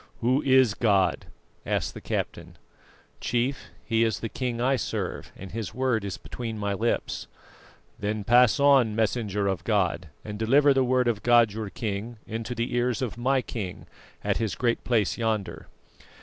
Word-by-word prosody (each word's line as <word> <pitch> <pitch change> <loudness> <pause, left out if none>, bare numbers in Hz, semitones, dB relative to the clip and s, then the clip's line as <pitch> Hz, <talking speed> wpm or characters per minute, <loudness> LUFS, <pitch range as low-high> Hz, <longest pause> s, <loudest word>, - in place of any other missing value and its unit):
"Who 130 +4 +2
is 130 -4 +4
God?" 100 -7 +2 0.4
asked - - -1
the - - -9
captain. - - -4 0.6
"Chief, 125 +4 -1 0.2
He 115 -1 +2
is 110 -5 0
the 115 - -4
King 120 0 -3
I 130 +3 +2
serve, 125 - -4
and 95 0 -9
His 110 0 -5
word 125 -4 +1
is 100 -2 -4
between 115 -3 -6
my 100 -1 -1
lips." 115 +4 -1 0.7
"Then 105 0 -2
pass 120 +1 +5
on, 135 -6 +5
Messenger 105 -2 0
of 95 -3 -1
God, 90 -6 0 0.2
and 105 -1 -6
deliver 140 +6 +5
the 135 -1 +3
word 125 0 +2
of 110 -3 0
God 120 -3 +5
your 110 -1 -4
King 110 +3 -4
into 115 +2 -4
the 115 +1 -2
ears 120 +1 0
of 120 - -3
my 130 +2 +1
king, 95 -6 -6 0.4
at - - +1
his 110 -6 -1
Great 120 +1 0
Place 115 -3 +1
yonder. 110 -4 -2
115 Hz, 165 wpm, -26 LUFS, 105-125 Hz, 0.7 s, pass